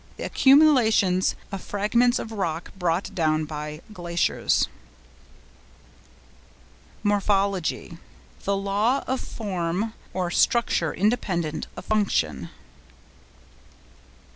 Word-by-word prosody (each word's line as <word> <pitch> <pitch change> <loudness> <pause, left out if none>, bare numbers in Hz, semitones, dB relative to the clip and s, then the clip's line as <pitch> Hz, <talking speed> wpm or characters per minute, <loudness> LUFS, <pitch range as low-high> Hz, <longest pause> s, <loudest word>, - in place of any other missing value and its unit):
—The - - -6
accumulations 250 -10 +4 0.2
of 195 -2 -5
fragments 235 +4 +1
of 225 - -5
rock 175 -6 -3
brought 180 +1 -1
down 155 -3 +1
by 150 0 -6
glaciers. 175 -2 0 2.4
MORPHOLOGY.—The 200 -2 -1
law 205 +7 +1
of 260 0 -2
form 195 0 -3 0.2
or 180 -2 -2
structure 175 -10 +2
independent 180 -7 -1
of - - -8
function. 190 - 0
195 Hz, 80 wpm, -25 LUFS, 170-215 Hz, 2.4 s, accumulations